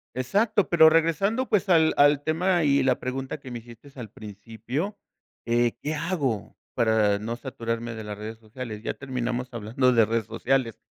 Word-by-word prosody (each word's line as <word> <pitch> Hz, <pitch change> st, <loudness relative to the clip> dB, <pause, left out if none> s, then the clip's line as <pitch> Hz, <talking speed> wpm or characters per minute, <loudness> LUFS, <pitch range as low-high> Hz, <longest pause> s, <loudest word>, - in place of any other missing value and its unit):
Exacto, 205 Hz, -, +1 dB
pero 160 Hz, -2 st, +7 dB
regresando, 195 Hz, -, +1 dB
pues, 205 Hz, -2 st, +1 dB
al 160 Hz, -3 st, +5 dB
al 145 Hz, 0 st, +5 dB
tema 175 Hz, +3 st, +1 dB
y 140 Hz, -2 st, +3 dB
la 130 Hz, -1 st, +2 dB
pregunta 130 Hz, +3 st, -4 dB
que 135 Hz, -2 st, -11 dB
me 120 Hz, -, -5 dB
hiciste 120 Hz, +4 st, -15 dB
al 115 Hz, -5 st, -8 dB
principio, 115 Hz, -, -6 dB, 0.5 s
eh, 120 Hz, 0 st, +2 dB
¿qué 155 Hz, +2 st, -2 dB
hago 150 Hz, -, -2 dB, 0.2 s
para 110 Hz, -3 st, +3 dB
no 115 Hz, +3 st, -4 dB
saturarme 115 Hz, -2 st, -4 dB
de 110 Hz, -, -7 dB
las 105 Hz, 0 st, -6 dB
redes 110 Hz, +1 st, -7 dB
sociales? 110 Hz, -1 st, -8 dB
Ya -, -, -2 dB
terminamos 125 Hz, -2 st, -3 dB
hablando 120 Hz, +3 st, +1 dB
de 115 Hz, -3 st, +5 dB
redes 115 Hz, -1 st, -1 dB
sociales. 115 Hz, +1 st, -1 dB
125 Hz, 170 wpm, -25 LUFS, 115-155 Hz, 0.5 s, pero